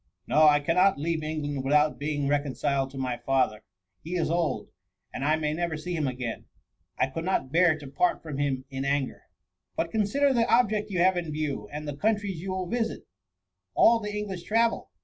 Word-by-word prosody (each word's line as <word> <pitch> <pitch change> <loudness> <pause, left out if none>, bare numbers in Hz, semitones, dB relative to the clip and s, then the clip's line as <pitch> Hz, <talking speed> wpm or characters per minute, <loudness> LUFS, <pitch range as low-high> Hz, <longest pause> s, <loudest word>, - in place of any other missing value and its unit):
No! 155 0 +5
I 145 -1 +6
cannot 180 +5 +3
leave 160 +2 -1
England 150 -3 -3
without 150 +2 +3
being 145 -1 -1
reconciled 140 -1 0
to 135 - -11
my 130 -2 -2
father: 130 -5 0 0.4
he 170 +3 -4
is 165 -2 0
old, 165 -11 -1 0.4
and 135 - -4
I 155 +2 +3
may 150 -1 -1
never 170 -1 -2
see 175 +3 -4
him 155 -4 0
again; 125 -3 -4 0.5
I - - +3
could 135 +5 -5
not 175 -7 -1
bear 170 -1 +4
to 145 - -11
part 140 +6 0
from 150 -4 -5
him 135 -2 -1
in 135 0 -3
anger." 140 -1 -1
•* - - -45 0.4
But 165 - -1
consider 265 +7 +2
the 235 -1 +2
object 215 -3 +3
you 190 - -3
have 185 0 +4
in 165 -3 -3
view; 145 -9 -3
and 150 +1 -6
the 145 - -4
countries 205 -1 -1
you 190 - -5
will 185 0 -2
visit: 225 +3 -2 0.7
all 230 0 +6
the 210 -2 -5
English 195 -4 -4
travel. 225 +5 +1
155 Hz, 200 wpm, -27 LUFS, 140-185 Hz, 0.7 s, I